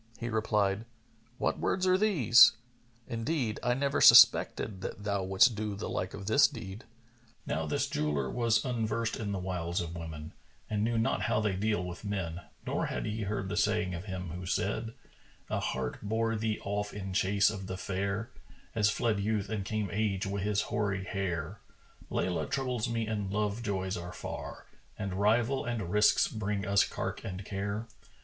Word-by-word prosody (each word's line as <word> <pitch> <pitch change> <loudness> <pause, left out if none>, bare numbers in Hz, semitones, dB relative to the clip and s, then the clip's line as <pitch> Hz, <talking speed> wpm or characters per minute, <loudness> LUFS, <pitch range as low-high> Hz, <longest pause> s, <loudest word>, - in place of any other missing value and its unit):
He 120 - -3
replied, 105 -1 +1 0.5
"What - - 0
words 185 0 0
are 185 0 +5
these? 165 - +6 0.5
Indeed, 120 -1 -2
I 125 +1 +1
never 140 +1 0
suspected 100 -4 +7
that 100 - -6
thou 100 -2 -1
wouldst 95 +7 +5
do 105 -1 -3
the 100 - -5
like 90 +1 -3
of 100 - -8
this 110 +8 +6
deed." 115 -4 -8 0.6
Now - - -2
this - - 0
jeweller 75 -3 -1
was 115 - +1
unversed 115 -2 -1
in 105 -3 -3
the 100 - -2
wiles 90 -2 -2
of 85 -1 -4
women 80 -2 -7 0.3
and 105 -1 -1
knew 115 +1 +1
not 115 -1 +1
how 105 +1 +1
they 105 -3 0
deal 105 -1 0
with 90 +2 -7
men, 95 -5 -3 0.2
nor - - -1
had - - -3
he 110 +1 -3
heard 100 -1 -2
the 100 - -3
saying 105 -2 +1
of 85 +2 -6
him 95 -3 -5
who 90 +2 -6
said, 110 +4 -1 0.6
"A - - +1
heart 65 -1 -3
bore 115 +2 0
thee 110 0 -1
off 105 +1 -3
in 95 -2 -5
chase 100 +2 +3
of 95 -3 -6
the 95 -1 -4
fair, 100 +3 -3 0.2
* - - -25
As 105 -2 +3
fled 110 -1 0
Youth 105 0 -1
and 110 -3 -2
came 105 +1 -2
Age 100 -2 0
wi' 100 0 -2
his 105 0 +1
hoary 100 -2 -1
hair: 95 -5 -3 0.5
Laylа 90 -2 -1
troubles 125 -5 -1
me 115 -1 -1
and 105 -3 -3
love 105 +2 -1
joys 95 -4 -2
are 85 +1 -6
far; - - -7 0.2
* - - -33
And 100 -3 -3
rival 115 +7 +2
and 115 -7 -3
risks 105 +1 +4
brings 105 -2 -3
us 100 0 +4
cark - - -4
and 95 +1 -6
care. 100 +2 -3
105 Hz, 185 wpm, -30 LUFS, 95-110 Hz, 0.6 s, suspected